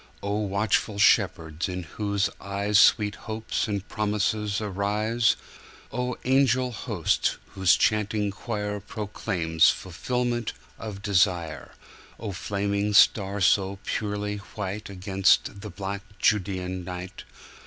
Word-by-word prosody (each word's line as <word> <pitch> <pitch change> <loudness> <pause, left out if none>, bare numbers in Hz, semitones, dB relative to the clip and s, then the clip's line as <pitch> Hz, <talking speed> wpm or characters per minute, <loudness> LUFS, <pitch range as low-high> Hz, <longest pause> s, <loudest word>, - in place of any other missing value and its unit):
O 100 +1 -1
watchful 105 +1 0
shepherds 85 -6 +2
in 90 0 -4
whose 100 +4 -1
eyesSweet 100 +1 +3
hopes 110 +2 -3
and 100 -1 -3
promises 105 -1 0
arise!O 110 +4 -2
angel 130 -1 +3
host 110 - 0
whose 95 -2 +4
chanting 105 -1 +1
choirProclaims 105 -5 0
fulfillment 120 +5 -2 0.3
of 105 -3 -7
desire!O 95 +2 -2
flaming 100 +2 -1
star 100 -1 +5
so 95 +1 +3
purely 105 -1 -2
whiteAgainst 100 -1 0
the 105 - -7
black 95 +2 -5 0.2
Judean 95 -2 0
night! 90 +1 -7
100 Hz, 90 wpm, -26 LUFS, 95-105 Hz, 0.3 s, star